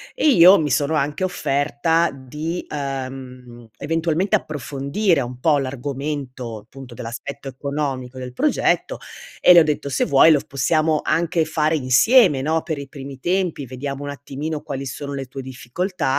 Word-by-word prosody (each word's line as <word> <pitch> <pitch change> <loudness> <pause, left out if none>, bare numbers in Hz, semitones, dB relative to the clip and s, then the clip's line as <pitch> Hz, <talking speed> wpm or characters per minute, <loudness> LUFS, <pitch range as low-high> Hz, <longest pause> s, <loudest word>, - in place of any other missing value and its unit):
e 315 - +3
io 185 -5 +8
mi 150 -3 -1
sono 145 +4 +1
anche 150 +4 -1
offerta 165 -1 +1
di, 150 +6 -5
ehm, 130 -4 -6
eventualmente 165 +6 0
approfondire 145 - -1
un 125 0 -6
po' 150 +1 +3
l'argomento 135 -2 -4
appunto 120 +3 -12
dell'aspetto 130 +5 -7
economico 135 -1 -4
del 125 -1 -7
progetto, 305 - +1 0.4
e - - +7
le 175 - +9
ho - - +6
detto: 150 -2 -2
"Se 130 - 0
vuoi 140 +4 +6
lo 150 - +5
possiamo 155 +3 +1
anche 170 0 +1
fare 155 0 +1
insieme, 150 - +4
no, 160 +3 0
per 155 -3 -4
i 140 - -7
primi 135 -1 -9
tempi, 175 -3 -1
vediamo 135 +2 -5
un 145 - -5
attimino 145 +2 -5
quali 135 -1 -5
sono 140 +2 -6
le 135 -1 -4
tue 130 +1 -8
difficoltà 130 +9 -4
140 Hz, 155 wpm, -21 LUFS, 130-160 Hz, 0.4 s, le